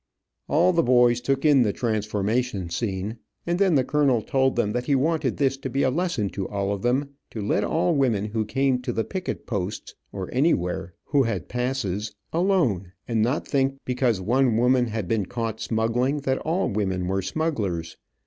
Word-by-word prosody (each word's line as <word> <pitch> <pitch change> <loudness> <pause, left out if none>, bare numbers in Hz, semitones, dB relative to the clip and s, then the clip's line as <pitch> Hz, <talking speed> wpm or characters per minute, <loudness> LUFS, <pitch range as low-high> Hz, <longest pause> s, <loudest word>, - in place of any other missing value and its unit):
All 175 +5 +4
the 170 - +4
boys 120 -2 +4
took 135 +3 0
in 145 -3 +6
the 110 -4 +2
transformation 105 -2 -1
scene, 105 +2 -3 0.3
and 175 +1 0
then 190 -5 +4
the 135 - +4
colonel 135 -5 +2
told 130 +2 +1
them 105 -3 +1
that 125 +2 -3
he 140 - +3
wanted 145 -1 0
this 135 -1 +1
to 135 -1 -5
be 135 +3 0
a 130 - +3
lesson 170 - 0
to 95 - -4
all 100 0 -1
of 100 - -5
them, 135 +5 0 0.2
to 110 - -7
let 105 0 0
all 170 +7 +1
women 120 -8 +1
who 110 +1 -1
came 135 +2 +1
to 125 - -3
the 115 -1 -1
picket 185 - -5
posts, 100 -2 -4 0.2
or 95 -2 -5
anywhere, 95 - 0
who 145 -2 +2
had 115 -3 -1
passes, 120 -5 -2 0.2
alone, 155 - +1
and 115 -2 +1
not 125 +7 0
think 135 -1 +1
because 125 -4 +1
one 120 +4 +2
woman 125 +1 +3
had 110 -4 -3
been 105 -3 0
caught 115 -2 -3
smuggling, 120 +6 0
that 130 -1 0
all 170 +4 0
women 95 -3 -1
were 95 +1 0
smugglers. 95 - -2
120 Hz, 185 wpm, -25 LUFS, 105-135 Hz, 0.3 s, in